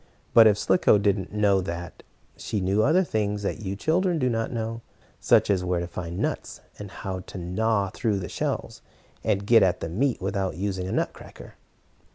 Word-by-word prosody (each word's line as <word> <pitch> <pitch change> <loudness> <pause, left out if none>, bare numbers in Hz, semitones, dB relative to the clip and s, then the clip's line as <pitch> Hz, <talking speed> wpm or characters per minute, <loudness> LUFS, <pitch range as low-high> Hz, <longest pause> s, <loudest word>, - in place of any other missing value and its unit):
But, 115 -1 +8
if 105 -2 +4
Slicko 110 -3 +3
did 100 -1 +2
not 95 -3 -6
know 100 -2 +2
that, 85 -1 -6 0.3
she 105 - -3
knew 95 +3 +1
other 165 +10 +4
things 105 - -2
that - - -2
you 100 -2 -4
children 170 - +1
do 130 -4 +1
not 115 0 -2
know, 115 -1 -4 0.4
such - - +4
as 95 -2 +1
where 90 -1 0
to 85 - -3
find 85 0 -6
nuts, - - -3 0.2
and 105 -1 -7
how 95 0 -5
to 95 - -10
gnaw 100 +3 0
through 110 -3 -1
the 90 -2 -4
shells, - - -4 0.4
and 100 -2 0
get 115 +2 +6
at 90 -2 +2
the 80 - -4
meat 125 +9 0
without 95 -1 -2
using 95 -1 -2
a - - -4
nut - - -1
cracker. - - -13
100 Hz, 200 wpm, -25 LUFS, 95-110 Hz, 0.4 s, But